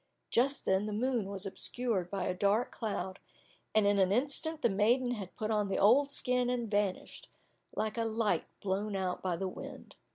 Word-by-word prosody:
Just 275 +4 +2
then 190 +2 +2
the 210 - -3
moon 235 -2 0
was 200 0 -4
obscured 195 -1 0
by 195 -1 -2
a - - 0
dark 200 +6 +1
cloud, 200 -4 -4 0.6
and 215 -1 +5
in 200 0 +3
an 190 -1 +3
instant 290 +7 0
the - - +6
maiden 240 +6 +2
had 200 -6 -5
put 215 0 -2
on 210 -2 +1
the 195 - -1
old 265 +8 +5
skin 250 -3 0
and 240 -3 -2
vanished, 205 -2 -2 0.5
like 215 +1 -1
a - - +2
light 225 -1 0 0.2
blown 200 +1 -1
out 185 -2 -2
by 185 -2 -1
the 190 +3 -2
wind. 185 - -9
210 Hz, 190 wpm, -32 LUFS, 195-245 Hz, 0.6 s, the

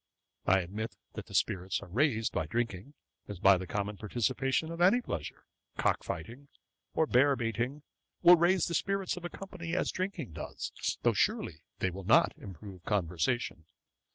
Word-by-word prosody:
I 95 +1 +5
admit 105 +6 -5 0.2
that - - -7
the - - -8
spirits 95 0 +1
are - - -10
raised 115 - +1
by 80 -2 -1
drinking, 115 - -3 0.3
as 105 - -6
by 95 +1 +6
the 95 - -6
common 105 +1 -2
participation 130 +8 0
of 165 +1 -5
any 190 +8 +6
pleasure: 80 - -5 0.3
cock - - +1
fighting, 120 - -6 0.5
or 160 - +4
bear 140 +1 +4
baiting, 120 +4 -2 0.4
will 175 +1 +10
raise 175 +2 +3
the 170 - -3
spirits 195 +3 0
of 180 -1 -7
a - - -3
company, 175 -4 -6
as - - +1
drinking 185 - -3
does, - - -5 0.3
though - - +4
surely 80 -2 0 0.2
they 95 - 0
will 95 +2 -7
not - - +5
improve 95 0 -10
conversation. 90 - -1
115 Hz, 165 wpm, -31 LUFS, -, 0.5 s, will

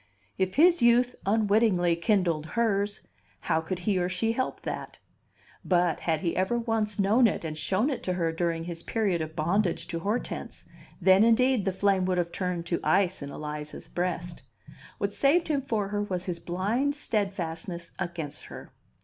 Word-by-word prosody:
If 185 0 0
his 340 +1 +5
youth 240 +1 +4
unwittingly 205 -4 +3
kindled 170 -4 +1
hers, 205 -2 +1 0.4
how 160 -1 +1
could 170 +3 -4
he 200 -3 +2
or 180 0 0
she 185 +5 0
help 255 +3 -2
that? - - -5 0.7
But, 175 -3 +2
had 160 -2 -1
he 170 - -1
ever 190 +6 +1
once 225 -3 -1
known 215 +5 +4
it 195 - -3
and 155 -1 -4
shown 195 - 0
it 260 - -3
to 185 - 0
her 170 -2 0
during 165 0 -1
his 170 -1 -5
period 200 -6 0
of 160 0 -5
bondage 170 +2 0
to 170 -2 -3
Hortense, 210 +8 -4 0.3
then, 190 +2 +6
indeed, 235 -1 +3
the 190 - +2
flame 190 0 +1
would 185 -1 0
have 170 -1 0
turned 180 -2 -3
to 170 0 -1
ice 185 +3 +2
in 140 - -5
Eliza's 150 0 -6
breast. 175 -1 -3 0.6
What - - -2
saved 320 +5 +3
him 290 -3 +1
for 220 -7 -2
her 205 0 -1
was 185 -3 -2
his 175 -2 -3
blind 220 +11 -1
steadfastness 180 - -3
against 160 -4 -5
her. - - -11
185 Hz, 175 wpm, -27 LUFS, 170-220 Hz, 0.7 s, then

